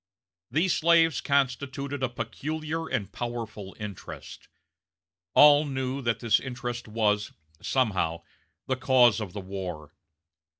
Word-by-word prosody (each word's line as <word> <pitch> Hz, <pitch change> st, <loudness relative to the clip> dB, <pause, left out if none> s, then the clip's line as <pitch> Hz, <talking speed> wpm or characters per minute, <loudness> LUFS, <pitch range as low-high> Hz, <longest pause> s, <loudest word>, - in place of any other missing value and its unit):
These 170 Hz, +4 st, +2 dB
slaves 165 Hz, -3 st, +4 dB
constituted 140 Hz, 0 st, -1 dB
a 130 Hz, -, +1 dB
peculiar 155 Hz, +7 st, -4 dB
and 100 Hz, -1 st, -2 dB
powerful 115 Hz, -5 st, -6 dB
interest. 105 Hz, -3 st, -8 dB, 0.9 s
All 145 Hz, 0 st, +8 dB
knew 135 Hz, -1 st, -3 dB
that 115 Hz, -3 st, -1 dB
this 115 Hz, -3 st, +3 dB
interest 120 Hz, -2 st, -5 dB
was, 105 Hz, -1 st, 0 dB, 0.3 s
somehow, 95 Hz, -10 st, 0 dB, 0.4 s
the 130 Hz, -, -1 dB
cause 125 Hz, -4 st, +4 dB
of 100 Hz, -4 st, -6 dB
the 100 Hz, -, -5 dB
war. 90 Hz, -6 st, -6 dB
125 Hz, 115 wpm, -27 LUFS, 105-140 Hz, 0.9 s, All